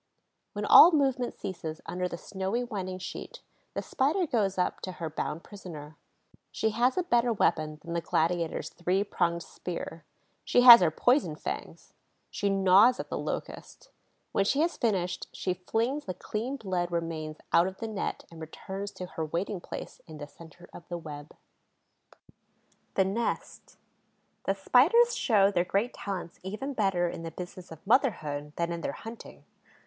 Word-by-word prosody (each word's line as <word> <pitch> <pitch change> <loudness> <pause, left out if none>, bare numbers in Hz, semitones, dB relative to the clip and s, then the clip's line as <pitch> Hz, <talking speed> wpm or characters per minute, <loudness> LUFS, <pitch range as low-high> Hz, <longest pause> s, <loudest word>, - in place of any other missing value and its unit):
When - - -3
all 345 - +10
movement 270 -5 +1
ceases 160 -4 -6
under 180 0 -2
the 170 - -6
snowy 195 +7 -3
winding 190 -5 -4
sheet, 185 - -8 0.3
the - - -2
Spider 315 +8 +1
goes 205 - 0
up 180 - 0
to 185 - -5
her 165 -3 -5
bound 155 +1 -4
prisoner. 160 -7 -10 0.6
She 220 - 0
has 245 +6 +2
a 365 - +2
better 240 -6 +2
weapon 155 -7 +1
than 170 0 -6
the 170 - 0
gladiator's 165 0 0
three 180 +3 0
pronged 170 -4 -1
spear: 165 -2 -7 0.4
she 245 - +3
has 240 -3 +11
her 175 - +4
poison 245 - +2
fangs. - - -7 0.4
She 205 - -1
gnaws 195 +5 +5
at - - -5
the - - -3
Locust. - - -6 0.4
When 200 - +2
she 275 +9 +1
has 335 +1 +1
finished, 180 -6 -1
she 185 - -2
flings 230 +10 -2
the 185 - -4
clean 225 +8 -4
bled 180 -6 -2
remains 160 -2 -3 0.2
out 170 +2 +5
of 190 0 -6
the 225 - -5
net 215 -3 -4
and 165 -1 -11
returns 190 +5 -6
to 180 - -6
her 165 -2 -5
waiting 175 +4 -3
place - - -8
in 155 -2 -10
the 145 - -6
centre 165 +3 -15
of 170 - -12
the 175 - -4
web. 150 -3 -9 1.6
THE 190 - +3
NEST 220 +5 -3 0.7
The 195 - +1
Spiders 355 - +4
show 205 - +3
their 175 -3 +2
great 200 +7 -1
talents 185 -4 -6
even 215 +9 -5
better 195 -6 +1
in 170 - -5
the 165 - -5
business 175 +1 -9
of 160 +4 -12
motherhood 155 - +1
than 170 0 -1
in 170 0 -4
their - - -3
hunting. 225 +1 -10
185 Hz, 165 wpm, -29 LUFS, 170-230 Hz, 1.6 s, has